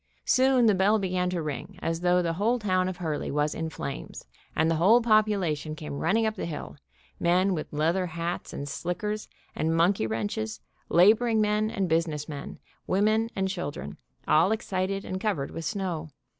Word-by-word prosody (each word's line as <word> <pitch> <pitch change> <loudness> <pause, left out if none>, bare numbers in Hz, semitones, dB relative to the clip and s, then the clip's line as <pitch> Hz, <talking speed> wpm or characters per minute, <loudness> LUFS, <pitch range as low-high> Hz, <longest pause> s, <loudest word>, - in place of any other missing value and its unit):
Soon 260 -1 +4
the 215 - +5
bell 195 +3 +3
began 185 -2 0
to 175 -3 -2
ring 155 +6 -5
as 165 -2 -2
though 180 0 +3
the 165 -1 0
whole 215 +8 +1
town 185 -4 +1
of 185 - -6
Hurley 160 -4 -3
was 150 +1 0
in 160 0 -3
flames, 140 -3 -6 0.3
and 160 - +3
the 165 -1 +1
whole 205 +9 +6
popula 215 -7 +3
tion 155 +1 -6
came 150 -2 -6
running 225 +3 +2
up 220 - 0
the 195 - -4
hill, 155 - -6 0.4
men 185 +3 +3
with 155 - -4
leather 165 +5 +1
hats 170 +1 -4
and 140 - -5
slickers, 210 +8 -3 0.3
and 160 +1 0
monkey 170 - +3
wrenches, 110 0 -3 0.3
laboring 220 +6 +5
men 210 0 +2
and 195 -4 -1
business 160 -3 0
men, 145 -2 -7 0.3
women 215 +4 +2
and 190 -1 0
children, 145 - -5 0.3
all 160 +6 +4
excited 195 -3 -2
and 185 0 -4
covered 200 -11 -1
with 165 - -6
snow. 180 -6 -3
180 Hz, 180 wpm, -27 LUFS, 160-210 Hz, 0.4 s, whole